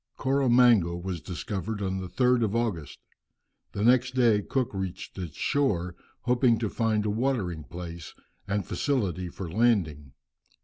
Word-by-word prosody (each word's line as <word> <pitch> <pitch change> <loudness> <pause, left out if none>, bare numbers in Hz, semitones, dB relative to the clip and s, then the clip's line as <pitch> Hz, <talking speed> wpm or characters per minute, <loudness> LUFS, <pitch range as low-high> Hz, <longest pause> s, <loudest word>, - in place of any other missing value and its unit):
Koro 135 0 +1
Mango 120 -8 +5
was 85 -1 -5
discovered 95 +3 -4
on 95 -1 -2
the 95 - -5
3rd 125 +5 +2
of 105 +1 -2
August. 105 - -2 0.8
Next 125 +4 +3
day 115 -5 +4
Cook 130 +3 -2
reached 95 -2 -5
its 85 -6 -6
shore, 90 - 0 0.3
hoping 120 -1 +3
to 110 -2 -2
find 110 -2 0
a 105 - +1
watering 105 - -1
place, 85 -1 -8 0.3
and 100 -2 -1
facility 95 - -1
for 90 +1 -7
landing. 80 - +1
105 Hz, 140 wpm, -27 LUFS, 90-120 Hz, 0.8 s, Mango